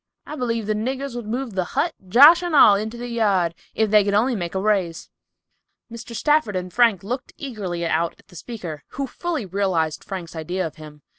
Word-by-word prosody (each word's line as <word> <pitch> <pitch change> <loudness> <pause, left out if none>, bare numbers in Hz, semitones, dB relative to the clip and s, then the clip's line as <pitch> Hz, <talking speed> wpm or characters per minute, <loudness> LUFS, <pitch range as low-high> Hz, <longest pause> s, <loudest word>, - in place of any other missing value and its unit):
I 300 - -7
b'lieve 230 -5 -2
the 215 - 0
niggers 260 +4 -3
would 240 -3 -6
move 245 +1 -3
the 190 -1 0
hut, 335 +1 +1 0.2
Josh 285 - +8
and 350 -3 -2
all, 220 -7 +8
into 215 +3 -2
the 245 +1 -6
yard, 200 -8 +1 0.2
if 220 -2 +1
they 210 -1 +6
could 200 0 0
only 240 +4 +2
make 175 -3 -4
a - - +1
raise!" 190 -5 -1 0.8
Mr. 235 0 -8
Stafford 295 -3 +2
and 180 -1 -4
Frank 230 -7 +3
looked 250 +6 -5
eagerly 195 -11 -4
out 165 0 0
at - - -25
the - - -16
speaker, 170 -7 -7 0.2
who 275 - -1
fully 320 - -4
realized 180 -5 -1
Frank's 180 -4 -7
idea 175 +3 -3
of 155 -1 -7
him. 150 -2 -12
210 Hz, 205 wpm, -22 LUFS, 180-245 Hz, 0.8 s, Josh